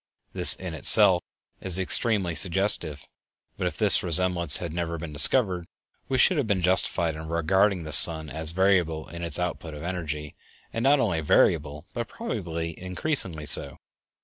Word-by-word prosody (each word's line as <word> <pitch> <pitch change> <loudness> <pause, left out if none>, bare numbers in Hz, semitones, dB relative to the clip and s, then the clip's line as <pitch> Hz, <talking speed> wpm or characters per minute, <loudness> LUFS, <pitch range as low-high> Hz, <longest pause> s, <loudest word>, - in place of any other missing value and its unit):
This - - +5
in 90 -3 -8
itself 90 +3 +5 0.4
is 95 -2 +3
extremely 95 -1 -1
suggestive; 85 -5 -3 0.5
but - - -3
if - - -6
this - - +4
resemblance 85 -2 +3
had 85 -3 -6
never 85 -1 -4
been 80 -2 -8
discovered, 90 - +2 0.4
we 130 - -1
should 180 +6 +3
have 140 -6 -1
been 95 -4 -1
justified 85 -3 +1
in 80 +1 -9
regarding 90 +3 0
the 75 - -8
sun 80 +1 +4
as 80 +1 -5
variable 85 -3 0
in 85 0 -9
its 85 -3 +3
output 85 -3 -5
of 75 - -10
energy; 75 -5 -6 0.4
and 115 - -4
not 140 +3 +3
only 85 -10 -1
variable, 75 0 0
but 120 -1 -5
probably 85 - -6
increasingly 90 - -4
so. 70 -1 -3
85 Hz, 160 wpm, -24 LUFS, 80-95 Hz, 0.5 s, This